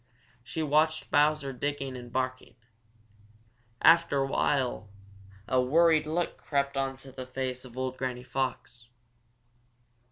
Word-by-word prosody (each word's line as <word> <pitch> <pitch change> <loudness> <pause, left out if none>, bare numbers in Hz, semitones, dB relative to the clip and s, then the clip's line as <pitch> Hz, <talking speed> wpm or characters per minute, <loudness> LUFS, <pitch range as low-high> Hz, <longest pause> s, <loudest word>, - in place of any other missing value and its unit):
She 160 +6 -4
watched 155 +1 +1
Bowser 145 -2 +2
digging 135 0 -3
and 120 -1 -9
barking. 130 0 -3 1.3
After 165 -3 +6
a 135 - +2
while 130 -5 0 0.6
a 130 0 +3
worried 155 +3 +4
look 170 +3 -1
crept 140 -1 -1
into 135 0 -3
the 130 -1 -8
face 130 0 -4
of 125 -1 -13
old 130 0 -3
Granny 125 -1 -3
Fox. 130 -2 -4
135 Hz, 120 wpm, -29 LUFS, 130-150 Hz, 1.3 s, After